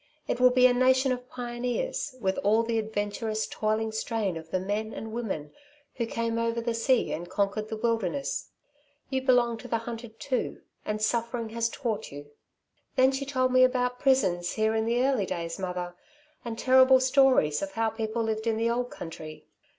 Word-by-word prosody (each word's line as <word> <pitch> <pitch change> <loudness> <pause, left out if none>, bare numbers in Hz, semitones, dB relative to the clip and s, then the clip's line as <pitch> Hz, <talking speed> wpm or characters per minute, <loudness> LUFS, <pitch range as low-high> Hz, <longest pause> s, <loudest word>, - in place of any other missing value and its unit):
It - - -1
will 250 0 +7
be 250 0 +4
a 250 - +6
nation 260 +1 +3
of 250 0 -4
pioneers, 245 - -3
with 190 -4 0
all 215 +3 +3
the 230 0 0
adventurous, 215 0 -2
toiling 215 +1 -1
strain 220 -4 -2
of 160 0 -8
the 185 - 0
men 210 +4 -3
and 220 - -6
women 190 -11 -4 0.4
who 235 -2 -1
came 230 0 -1
over 230 0 0
the 230 0 -1
sea 235 +2 +2
and 175 +2 -5
conquered 200 +3 -1
the 220 - -4
wilderness. 230 +4 -1 0.6
You 265 0 0
belong 245 -3 +3
to 250 - -9
the 230 - 0
hunted 230 0 -8
too, 260 -3 -2 0.2
and 215 0 -2
suffering 235 0 -1
has 230 +1 -1
taught 230 -4 -3
you.' 145 +1 -10 0.6
"Then 260 0 +5
she 270 +1 -3
told 255 -2 +1
me 255 0 +6
about 250 -1 +1
prisons 180 -11 +2
here 220 0 +1
in 220 0 0
the 240 +2 +2
early 255 -8 +1
days, 170 -1 -4
mother, 180 -1 -4 0.5
and 230 -2 -5
terrible 260 +1 +6
stories 255 - +4
of 195 0 -4
how 225 -1 0
people 225 +1 -2
lived 220 0 -2
in 225 -1 +1
the 230 +1 +1
old 245 +1 -1
country. 155 -2 -9
230 Hz, 185 wpm, -28 LUFS, 215-250 Hz, 0.6 s, will